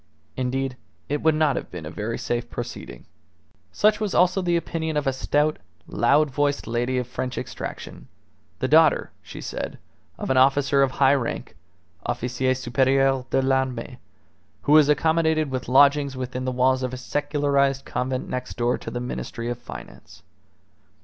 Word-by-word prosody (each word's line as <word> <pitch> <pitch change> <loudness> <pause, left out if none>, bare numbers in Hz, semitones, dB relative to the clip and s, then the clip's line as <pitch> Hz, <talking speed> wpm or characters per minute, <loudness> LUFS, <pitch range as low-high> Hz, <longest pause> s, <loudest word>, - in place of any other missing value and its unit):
Indeed, 130 0 -2 0.3
it 145 +1 -1
would 160 -1 +3
not 155 -3 +2
have - - -4
been 85 -3 -8
a 75 - -6
very 110 +5 -3
safe 120 0 -3
proceeding. 120 - -7 0.7
Such 210 +1 +3
was 210 -3 -2
also 185 +2 +3
the 175 -1 +1
opinion 160 -2 -3
of 150 - -1
a 135 - +1
stout, 145 +3 0 0.3
loud 140 +6 +2
voiced 145 +1 0
lady 120 +2 -1
of 125 - -1
French 125 +1 -5
extraction, - - -7 0.5
the - - -1
daughter, - - +4
she - - -10
said, - - -5 0.4
of - - -3
an 130 - +2
officer 140 +1 +4
of 135 - +4
high 135 0 +4
rank 120 -8 -3 0.5
(officier 125 +2 -1
superieur 130 +1 +2
de 135 - +1
l'armee), 130 -2 -1 0.6
who - - 0
was 150 -1 +7
accommodated 160 -1 +2
with 130 -2 -4
lodgings 140 +1 +4
within 130 0 -4
the 130 - 0
walls 130 +1 +2
of 130 0 -3
a - - -7
secularized 140 0 0
convent 130 +1 -2
next 125 0 -5
door 120 +1 +1
to - - -7
the 120 - -4
Ministry 120 -1 -5
of 120 - -4
Finance. - - -11
135 Hz, 165 wpm, -24 LUFS, 125-145 Hz, 0.7 s, was